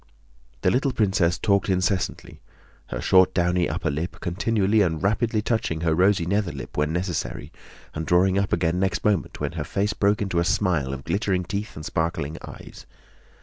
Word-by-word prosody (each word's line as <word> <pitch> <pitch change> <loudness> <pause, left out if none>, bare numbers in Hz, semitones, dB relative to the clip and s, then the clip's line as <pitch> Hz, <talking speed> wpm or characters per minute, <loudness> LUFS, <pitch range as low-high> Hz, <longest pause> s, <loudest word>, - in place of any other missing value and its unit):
The - - +3
little 135 +2 +1
princess 95 -7 +1
talked 100 -1 +1
incessantly, 90 -1 -1 0.5
her - - -5
short, 95 0 +4
downy 90 0 +2
upper 80 -2 -2
lip 80 +5 -4
continually 105 +3 +1
and 80 -3 0
rapidly 110 +2 +1
touching 110 -9 -1
her 80 -1 +2
rosy 95 +1 +3
nether 100 0 0
lip 70 -2 -9
when 75 +1 0
necessary 90 0 -3 0.4
and 80 - -3
drawing 95 +3 +3
up 100 - -1
again 85 0 +1
next 95 +1 -1
moment 105 -5 0
when - - -2
her - - -4
face 100 +2 -1
broke 100 0 +2
into 95 -4 -1
a - - +2
smile 85 -5 +1
of 70 0 -6
glittering 100 -1 0
teeth 100 +4 -5
and 75 - -8
sparkling 80 -2 -2
eyes. - - -11
90 Hz, 175 wpm, -24 LUFS, 85-100 Hz, 0.5 s, short